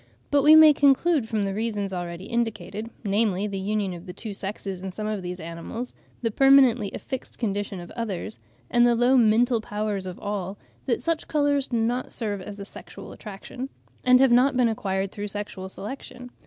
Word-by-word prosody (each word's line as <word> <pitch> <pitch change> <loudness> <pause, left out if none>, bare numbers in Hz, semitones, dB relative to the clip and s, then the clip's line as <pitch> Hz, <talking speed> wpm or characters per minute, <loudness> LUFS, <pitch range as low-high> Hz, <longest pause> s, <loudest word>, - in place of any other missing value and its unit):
but 285 -1 +4
we 300 +3 +8
may 315 -1 +9
conclude 280 -2 +3
from 215 -3 0
the 195 -1 -1
reasons 210 -2 -2
already 175 0 -5
indicated, 225 -1 -3 0.2
namely, 200 -1 +1
the 200 -2 -3
union 200 -1 -1
of 175 +2 -10
the 180 - -6
two 215 +1 -6
sexes 195 -1 -5
in 190 0 -5
some 210 +3 -5
of 215 -2 -2
these 180 0 -5
animals, 170 +9 -6 0.3
the 230 - +1
permanently 260 -4 +5
affixed 260 -1 -6
condition 205 -3 -2
of 175 - -10
others, 220 -3 -4 0.3
and 240 0 +5
the 240 - +4
low 245 +3 +4
mental 235 0 +4
powers 210 -2 -3
of 185 +1 -6
all, 200 -1 -4 0.3
that 235 - 0
such 330 -1 -1
colours 285 -2 +2
do 240 - -1
not 240 +3 -1
serve 205 -4 -3
as 205 +2 -8
a 200 - -6
sexual - - -10
attraction, 225 +5 -8 0.3
and 255 0 +6
have 265 -1 +5
not 255 +2 +4
been 245 -2 +4
acquired 195 -3 -2
through 205 0 -5
sexual 205 -2 -5
selection. 250 +4 -8
215 Hz, 190 wpm, -25 LUFS, 195-250 Hz, 0.3 s, may